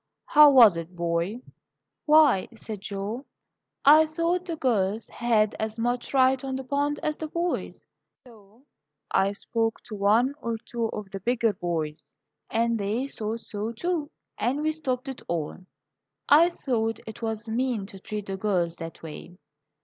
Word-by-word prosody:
"How 300 0 +8
was 235 -10 +7
it, 165 +2 -7
boy?" 170 +6 -1 0.7
"Why," 300 -10 +5
said 215 -3 -7
Joe, 205 +6 -5 0.6
"I 310 +3 +8
thought 335 +3 -1
the 335 -2 -3
girls 220 -6 0
had 220 -3 +1
as 220 0 -3
much 240 +1 -1
right 260 -1 +3
on 265 -1 -3
the 265 - -4
pond 285 +2 -1
as 305 0 -1
the 315 - -4
boys, 340 +3 -3 0.4
so 220 0 -19 0.5
I 195 +1 +2
spoke 225 +2 -1
to 215 - -8
one 215 +7 +3
or 230 -1 -2
two 235 -1 -2
of 210 -3 -7
the 195 - -5
bigger 230 +1 +1
boys, 165 -4 -4 0.3
and 230 0 +1
they 210 +6 -1
thought 225 -3 -4
so, 215 +2 -5
too, 320 +3 -2 0.3
and 275 +5 0
we 310 - +2
stopped 265 -5 -3
it 265 -1 -6
all. 165 -3 -3 0.7
I 320 +4 +7
thought 225 -9 -2
it 220 +2 -9
was 225 0 -3
mean 235 -2 -1
to 195 -1 -11
treat 210 +1 -5
the 195 -1 -4
girls 180 -4 0
that 165 -1 -8
way." 165 +3 -9
230 Hz, 160 wpm, -26 LUFS, 200-270 Hz, 0.7 s, How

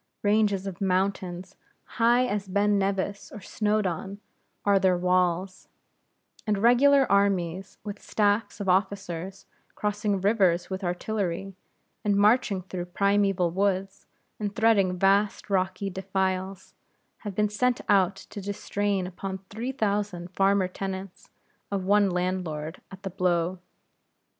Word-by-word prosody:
Ranges 205 -2 +2
of 195 -2 -6
mountains, 185 -1 -1 0.3
high 240 +1 +2
as 205 -4 -2
Ben 200 +1 +2
Nevis 195 0 -2
or 210 - -8
Snowdon, 200 -2 -2 0.5
are 200 -1 +4
their 185 -2 +3
walls; 180 +1 0 0.8
and 210 -1 +2
regular 265 +6 +5
armies, 195 -2 +1
with 205 -1 -7
staffs 205 0 0
of 200 - -4
officers, 190 0 -1 0.3
crossing 210 -1 -1
rivers 190 -3 +2
with 190 +1 -4
artillery, 190 0 -2 0.5
and 205 -1 +2
marching 205 -2 +3
through 180 -1 -5
primeval 195 -1 +1
woods, 195 +1 -1 0.3
and 205 -1 -3
threading 200 -5 +3
vast 200 +2 +2
rocky 190 +1 0
defiles, 190 0 -3 0.4
have 205 -3 -7
been 210 0 +2
sent 245 +4 +1
out 195 -2 +3
to 200 +1 -9
distrain 200 -1 -2
upon 190 +1 -5
three 230 +5 -3
thousand 205 -7 -2
farmer 195 0 +2
tenants 190 0 -6 0.4
of 200 -2 -2
one 205 0 +4
landlord, 180 -3 -3
at 190 +1 -11
a 190 - -3
blow. 180 -1 0
195 Hz, 125 wpm, -26 LUFS, 185-205 Hz, 0.8 s, regular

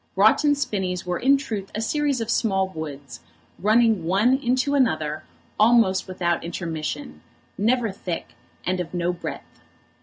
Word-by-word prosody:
Broughton 220 +9 +4
Spinnies 190 -10 -2
were 180 -1 -2
in 275 +2 +4
truth 215 -8 -5
a - - -2
series 280 +2 0
of 225 0 -2
small 190 -5 +1
woods, 145 -7 -7 0.4
running 220 -2 +3
one 200 +9 +3
into 260 +1 +1
another 155 - +1 0.4
almost 215 -4 +4
without 175 -2 -1
intermission, 155 - -5 0.3
never 230 +1 +1
thick, 180 -2 -6 0.3
and 185 0 0
of 180 0 -5
no 175 0 0
breadth. 170 - -8
195 Hz, 140 wpm, -24 LUFS, 170-235 Hz, 0.4 s, Broughton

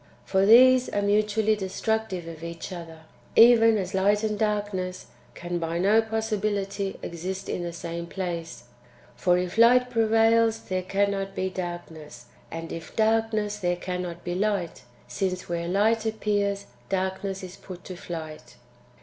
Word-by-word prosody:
For 190 0 +2
these 255 +3 +7
are 205 - -1
mutually 210 +1 +2
destructive 195 -2 -2
of 165 -1 -9
each 170 +2 -7
other, 165 -2 -9 0.3
even 225 -1 +7
as 190 -2 -3
light 205 +2 +2
and 215 -1 0
darkness 205 -3 -2 0.3
can 175 0 -4
by 165 0 -2
no 205 +5 +4
possibility 210 -3 -2
exist 185 +3 -5
in - - -3
the 175 0 -4
same 170 0 -6
place: 170 -7 -5 0.5
for 175 +9 +2
if 180 +4 -2
light 250 +2 +6
prevails, 225 0 +3
there 185 0 -2
cannot 195 +1 -1
be 190 0 -2
darkness; 170 -7 -7 0.2
and 165 0 -6
if 165 - -8
darkness, 220 -1 +1
there 175 -2 0
cannot 180 -1 -5
be 175 - -3
light, 195 -3 -1 0.3
since, 185 +8 -3
where 170 0 -3
light 215 +5 +2
appears, 205 -2 -1 0.2
darkness 190 0 -2
is 185 0 -8
put 180 -2 -11
to 185 - -8
flight. 155 -8 -8
195 Hz, 145 wpm, -26 LUFS, 175-215 Hz, 0.5 s, these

